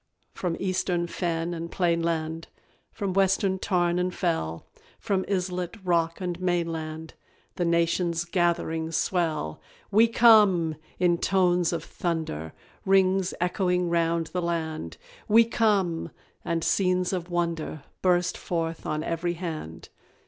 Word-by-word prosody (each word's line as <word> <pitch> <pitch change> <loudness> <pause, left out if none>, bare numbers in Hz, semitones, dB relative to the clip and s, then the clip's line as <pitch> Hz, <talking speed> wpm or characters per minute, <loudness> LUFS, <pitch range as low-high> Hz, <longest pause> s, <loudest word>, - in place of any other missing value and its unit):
From 175 -3 -2
Eastern 185 -2 0
fen 170 -1 -2
and 170 0 -5
plainland, 165 -2 -1 0.4
From 195 -2 -3
Western 195 0 +2
tarn 175 -2 +1
and 180 0 0
fell, 160 - -2 0.3
From 190 -2 -1
islet, 180 0 -2
rock, 170 -2 +1
and 180 -2 -3
mainland 165 -3 -2 0.4
The 175 - 0
nation's 170 0 +1
gathering 170 -2 0
swell. 160 - -1 0.3
"WE 220 +3 +6
COME!" 210 -9 +5 0.2
in 175 -1 +2
tones 180 -3 +2
of 170 - -3
thunder, 160 - -3 0.3
Rings 190 -1 +3
echoing 180 0 +1
round 170 0 +1
the 180 - 0
land; 160 - -3 0.3
"We 225 +2 +6
come!" 205 -7 +1 0.3
and 165 -1 -1
scenes 185 0 +1
of 180 -1 -3
wonder 170 -4 -2 0.2
Burst 180 -1 +2
forth 165 -1 -3
on 155 0 -1
every 170 +1 -1
hand. 155 - -6
175 Hz, 120 wpm, -26 LUFS, 165-185 Hz, 0.4 s, WE